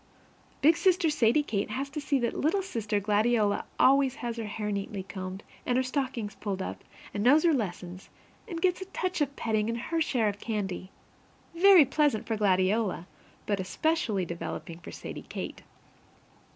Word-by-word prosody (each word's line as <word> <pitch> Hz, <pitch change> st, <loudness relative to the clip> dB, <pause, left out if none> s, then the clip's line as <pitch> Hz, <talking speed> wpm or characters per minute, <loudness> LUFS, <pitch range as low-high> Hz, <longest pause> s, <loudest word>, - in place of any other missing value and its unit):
Big 320 Hz, +3 st, +7 dB
sister 365 Hz, -4 st, +3 dB
Sadie 255 Hz, +1 st, +3 dB
Kate 205 Hz, -8 st, -2 dB
has 265 Hz, +6 st, -3 dB
to 300 Hz, -, -4 dB
see 285 Hz, -1 st, +1 dB
that 240 Hz, -2 st, 0 dB
little 360 Hz, +7 st, +1 dB
sister 220 Hz, -, -2 dB
Gladiola 210 Hz, +1 st, +2 dB
always 270 Hz, 0 st, +5 dB
has 240 Hz, -4 st, -4 dB
her 225 Hz, -, -3 dB
hair 210 Hz, 0 st, -3 dB
neatly 200 Hz, -1 st, -3 dB
combed 185 Hz, +1 st, -7 dB, 0.2 s
and 245 Hz, -, +1 dB
her 260 Hz, -, +3 dB
stockings 255 Hz, -5 st, -2 dB
pulled 195 Hz, -2 st, -4 dB
up 190 Hz, -, -5 dB, 0.3 s
and 205 Hz, -, -2 dB
knows 290 Hz, +6 st, +6 dB
her 335 Hz, -2 st, +4 dB
lessons 185 Hz, -6 st, -4 dB, 0.4 s
and 340 Hz, -5 st, -5 dB
gets 365 Hz, +1 st, +1 dB
a -, -, -4 dB
touch 370 Hz, -2 st, -3 dB
of 280 Hz, -1 st, 0 dB
petting 220 Hz, -1 st, 0 dB
and 230 Hz, -, -1 dB
her 325 Hz, +7 st, -2 dB
share 245 Hz, -7 st, +1 dB
of 205 Hz, 0 st, -2 dB
candy 195 Hz, -5 st, -3 dB, 0.7 s
very 365 Hz, -3 st, +8 dB
pleasant 280 Hz, -4 st, +1 dB
for 225 Hz, -, -1 dB
Gladiola, 195 Hz, -1 st, +1 dB, 0.4 s
but 205 Hz, -2 st, 0 dB
especially 215 Hz, -, 0 dB
developing 170 Hz, 0 st, -6 dB
for 175 Hz, -, -10 dB
Sadie -, -, -8 dB
Kate. -, -, -6 dB
230 Hz, 170 wpm, -29 LUFS, 205-295 Hz, 0.7 s, very